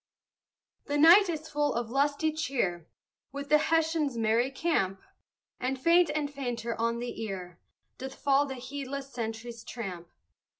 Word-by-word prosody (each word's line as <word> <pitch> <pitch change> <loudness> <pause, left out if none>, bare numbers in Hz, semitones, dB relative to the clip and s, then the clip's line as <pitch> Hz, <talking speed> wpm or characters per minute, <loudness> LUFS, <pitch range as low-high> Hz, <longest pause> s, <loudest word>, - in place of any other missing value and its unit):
The 290 - -1
night 350 +6 +8
is 315 -1 -3
full 295 -2 0
of 235 -1 -2
lusty 285 +3 +1
cheer 235 - -2 0.4
Within 280 +1 -6
the - - -1
Hessians' 320 -5 +1
merry 230 +3 +2
camp; 195 - 0 0.6
And 260 +1 -2
faint 335 +3 +5
and 290 -2 -2
fainter 240 -4 -3
on 230 0 +1
the 240 -1 -5
ear 185 -5 -6 0.4
Doth 265 +1 -6
fall 280 +1 +2
the 265 - -5
heedless 275 +1 -6
sentry's 230 0 -5
tramp. 185 -8 -6
265 Hz, 140 wpm, -29 LUFS, 230-290 Hz, 0.6 s, night